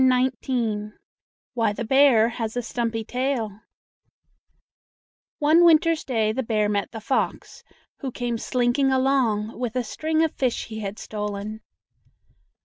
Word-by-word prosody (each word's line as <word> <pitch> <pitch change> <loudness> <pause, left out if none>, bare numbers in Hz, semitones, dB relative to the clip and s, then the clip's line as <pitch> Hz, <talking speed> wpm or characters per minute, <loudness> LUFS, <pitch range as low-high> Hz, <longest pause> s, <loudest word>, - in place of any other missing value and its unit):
WHY 225 -4 +1
THE 235 - -4
BEAR 265 -4 +5
HAS 225 -1 -4
A 245 - -1
STUMPY 230 -1 -2
TAIL 245 -4 -2 1.8
One 310 +4 +5
winter's 330 -1 +4
day 220 -4 0
the 255 +4 -2
bear 215 -3 0
met 205 -1 -1
the 225 - -7
fox, 245 +5 -2 0.4
who 270 -3 -4
came 240 -1 -3
slinking 255 +3 +1
along 250 -5 +1
with 245 -2 -3
a 250 - 0
string 315 +6 0
of 320 - 0
fish 255 -3 -1
he 220 -1 -7
had 205 0 -5
stolen. 210 0 -5
240 Hz, 130 wpm, -24 LUFS, 220-270 Hz, 1.8 s, BEAR